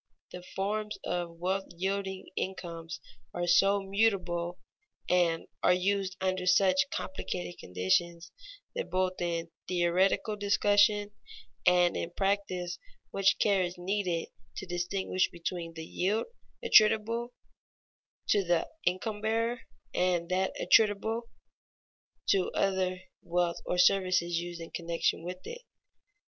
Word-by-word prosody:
_ - - -46
The 180 - -8
forms 210 +2 -2
of 170 -1 -3
wealth 190 +3 -1
yielding 190 +1 -2
incomes 170 -4 -5 0.4
are 175 - -1
so 195 +3 +4
mutable, 195 -4 0 0.5
and 170 -2 +2 0.2
are - - +5
used 190 0 0
under 185 -1 -1
such 185 +4 +4
complicated 175 -10 -4
conditions, 165 - 0 0.4
that 485 -1 -4
both 185 0 -1
in 170 -1 -2 0.2
theoretical 185 +4 +2
discussion 205 0 +3 0.6
and 180 -1 +5
in 170 - -2
practice 185 -2 -1 0.3
much 195 0 +3
care 200 -3 +3
is 175 0 -3
needed 180 -2 -1 0.3
to - - -5
distinguish 185 +1 -1
between 170 -1 -5
the 160 -1 -6
yield 200 +7 0 0.4
attributable 230 - +4 0.9
to 205 - +4
the 175 -2 +1 0.2
income 205 +4 -1
bearer, 230 +2 0 0.3
and 180 -2 +1
that 190 +1 0
attributable 220 +2 +3 1.0
to 190 -2 +3
other 185 -1 0 0.2
wealth 175 0 0
or 180 - 0
services 180 -2 +3
used 175 0 -6
in 165 - -8
connection 170 -1 -1
with 180 +1 -7
it. 480 +1 -7
185 Hz, 120 wpm, -30 LUFS, 175-200 Hz, 1.0 s, are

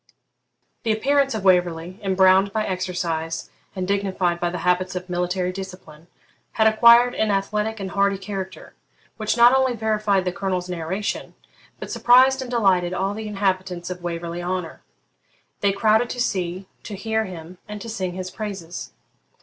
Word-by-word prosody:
The 225 - 0
appearance 275 +3 +2
of 215 - -4
Waverley, 180 0 +1
embrowned 190 0 +4
by 215 +1 -1
exercise 175 -3 -3 0.2
and 185 -1 -3
dignified 190 -3 0
by 175 - 0
the 175 - -4
habits 185 +1 +1
of 180 0 -5
military 180 +1 -1
discipline, 180 -4 -10 0.5
had 220 - +2
acquired 235 +3 +6
an 220 - 0
athletic 210 +2 -1
and 190 -1 -5
hardy 200 0 +2
character, 190 -1 -7 0.4
which 215 +1 -1
not 240 +1 +7
only 260 -2 +2
verified 215 -3 +1
the 180 - 0
Colonel's 185 -1 -2
narration, 180 +4 -4 0.4
but - - -7
surprised 260 +2 +5
and 255 - -6
delighted 185 -7 +2
all 195 +2 -1
the 215 +1 -6
inhabitants 185 -3 -2
of 180 -1 -6
Waverley 170 0 -4
Honour. 180 -2 -4 0.8
They 200 - +2
crowded 220 +4 +2
to 245 - -5
see, 185 -4 -2 0.2
to 210 - -7
hear 220 +2 -1
him, 180 -1 -10
and 210 0 -7
to 205 - -8
sing 190 -5 -3
his 185 0 -6
praises. 190 -5 -6
190 Hz, 160 wpm, -23 LUFS, 180-215 Hz, 0.8 s, not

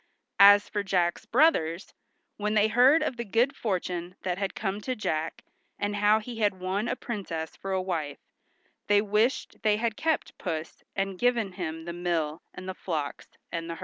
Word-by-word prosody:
As 205 +1 +8
for 205 - -2
Jack's 185 +1 0
brothers, 220 - +2 0.4
when 210 +1 -1
they 215 +1 +4
heard 260 +8 +5
of 260 -5 -2
the 235 - -2
good 235 +6 +1
fortune 180 -5 -3
that 180 0 -2
had 195 -1 -2
come 200 0 -2
to 255 +3 -2
Jack, 160 -7 -2 0.3
and 205 0 -2
how 210 +1 +5
he 225 +1 -6
had 205 -3 +1
won 190 +4 -1
a - - 0
princess 185 -10 -5
for 195 - -6
a 190 - +1
wife, 165 -6 -3 0.7
they 205 0 +5
wished 215 +5 +1
they 210 -1 +3
had 225 0 -1
kept 320 +3 -1
Puss 160 -3 -4
and 195 -1 -2
given 240 -5 +2
him 165 -3 -5
the 170 - -5
mill 170 -3 -1
and 185 - -9
the 185 - -3
flocks 155 -6 -4 0.2
and 165 0 -4
herds. 165 - -5
200 Hz, 180 wpm, -28 LUFS, 175-220 Hz, 0.7 s, As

